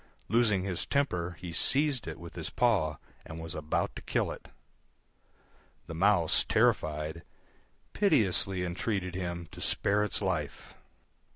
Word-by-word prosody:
Losing 110 -5 +3
his 95 -3 -2
temper 90 - 0
he 90 -2 -6
seized 135 - +2
it 80 - -6
with 85 0 -9
his 80 -2 -5
paw 100 - +2 0.3
and 80 +1 -8
was 80 -1 -6
about 75 0 -1
to - - -7
kill - - 0
it. - - -9 1.4
The 85 - -7
Mouse, 90 -1 +3
terrified, 75 +1 +1 0.7
piteously 95 - +2
entreated 90 +1 -2
him 85 -2 -4
to - - -10
spare 105 +1 +2
its 105 - -1
life. - - -3
90 Hz, 130 wpm, -30 LUFS, 85-105 Hz, 1.4 s, Losing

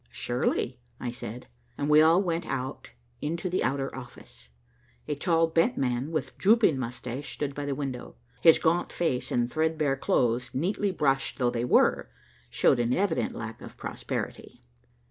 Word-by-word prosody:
"Surely," 120 - -1 0.2
I 120 - -3
said, 120 0 -7 0.3
and 145 - -1
we 150 +1 +7
all 165 +5 +5
went 170 -1 -2
out 130 +1 -4 0.3
into 165 +4 -2
the 185 - +1
outer 135 +1 -1
office. 120 - -12 0.6
A 150 - 0
tall, 165 +3 +2
bent 165 +9 +1
man 125 +2 -1
with 155 -4 -3
drooping 205 - +4
mustache 125 +2 -5
stood 145 -2 -3
by 145 +1 -4
the 140 - -1
window. 135 -3 -5 0.3
His 165 -1 +8
gaunt 170 +1 +1
face 160 -8 -1
and 120 0 +1
threadbare 155 -3 +1
clothes, 120 -1 0
neatly 195 +8 0
brushed 135 -6 0
though 125 -2 +1
they 120 0 -1
were, - - +3 0.4
showed 125 - +3
an 120 +1 +1
evident 190 -1 0
lack 110 -1 -6
of - - -11
prosperity. - - -5
140 Hz, 160 wpm, -28 LUFS, 125-165 Hz, 0.6 s, His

